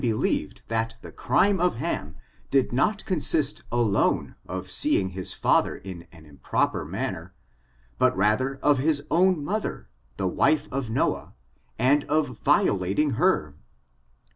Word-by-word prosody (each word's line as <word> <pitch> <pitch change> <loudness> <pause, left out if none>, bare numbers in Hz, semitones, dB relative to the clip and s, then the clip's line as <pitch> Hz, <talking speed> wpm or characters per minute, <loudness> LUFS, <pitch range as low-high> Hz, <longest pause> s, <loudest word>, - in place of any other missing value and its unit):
183 115 -3 +1
believed - - -3
that 115 0 -2
the - - -9
crime 190 +10 +2
of 180 +1 +1
Ham 115 - -4 0.3
did 135 -3 +1
not 205 - +1
consist 155 -4 +1
alone 115 -4 +1
of - - -3
seeing 95 -1 +2
his 95 0 -2
father - - +2
in 90 -3 -10
an 80 -3 -16
improper 70 -2 -1
manner, - - -5 0.6
but - - +3
rather 110 +7 +1
of 145 -2 +4
his 145 0 +1
own 175 -3 +3
mother, 185 - -3 0.3
the 95 - -1
wife 150 - +2
of 130 -3 -3
Noah, 110 - -1 0.4
and 140 +5 +3
of 145 -6 -1
violating 100 +10 +2
her. 125 - +1
130 Hz, 140 wpm, -25 LUFS, 100-155 Hz, 0.6 s, of